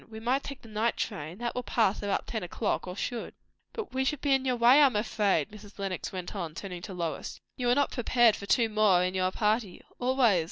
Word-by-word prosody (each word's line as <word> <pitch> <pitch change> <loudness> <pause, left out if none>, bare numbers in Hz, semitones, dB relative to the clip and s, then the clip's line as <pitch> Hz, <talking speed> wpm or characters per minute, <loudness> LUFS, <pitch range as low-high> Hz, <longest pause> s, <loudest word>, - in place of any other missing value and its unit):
We 220 0 -8
might 250 +5 +1
take 275 -1 -8
the - - -12
night 220 +2 -1
train. 175 -5 -4
That 240 +1 -3
will 250 - -2
pass 225 -4 +1
about 200 -1 -1
ten 220 - -4
o'clock, 185 +3 -2
or 180 - -5
should." 235 +3 -4 0.4
"But 440 - -6
we 265 0 +1
should 290 +1 -1
be 280 -1 +2
in 270 0 +1
your 255 -1 +1
way, 245 +5 +6
I 285 - +8
am 255 - -3
afraid," 210 -1 +1
Mrs. 210 -1 -13
Lenox 195 -2 -4
went 185 +1 -6
on, 170 -5 -4
turning 180 -1 -6
to 195 - -7
Lois. 165 -4 -4 0.2
"You 245 -1 -1
are 245 - +4
not 285 0 +2
prepared 240 -2 +3
for 200 - -8
two 235 +1 +3
more 210 -4 +3
in 180 0 -1
your 185 -1 +1
party." 210 -1 -1 0.2
"Always!" 245 -6 +3
215 Hz, 240 wpm, -29 LUFS, 190-245 Hz, 0.4 s, I